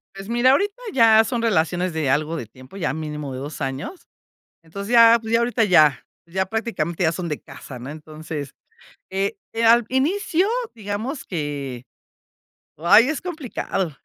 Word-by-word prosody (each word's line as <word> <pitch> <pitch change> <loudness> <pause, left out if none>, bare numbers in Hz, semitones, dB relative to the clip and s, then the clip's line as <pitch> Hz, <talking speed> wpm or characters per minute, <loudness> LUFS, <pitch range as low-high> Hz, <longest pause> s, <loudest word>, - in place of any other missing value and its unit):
Pues 195 +2 -9
mira, 240 +2 +4
ahorita 400 +8 +2 0.2
ya 225 -3 +6
son 235 +1 -2
relaciones 180 -4 0
de 155 -4 -1
algo 155 +4 0
de 115 - -5
tiempo, 130 - -14
ya 150 -7 -1
mínimo 150 -3 -5
de 130 - -5
2 145 +2 -7
años. 135 - -5 0.6
Entonces 200 +7 -7
ya, 230 0 +8
pues 220 0 -6
ya 230 - +4
ahorita 235 -1 +1
ya, 155 -8 +4 0.2
ya 190 +2 -2
prácticamente 190 -6 -3
ya 160 -1 +3
son 170 0 -4
de 150 - -4
casa, 125 -3 -11
¿no? 130 +4 -8
Entonces, 155 -1 -8 0.6
eh, 195 +1 -1 0.3
al 235 +1 +6
inicio, 340 +7 +1 0.3
digamos 220 +6 -5
que 140 -7 -5 1.0
ay, 220 - +6
es 310 - -2
complicado. 245 - -4
190 Hz, 160 wpm, -22 LUFS, 150-230 Hz, 1.0 s, ya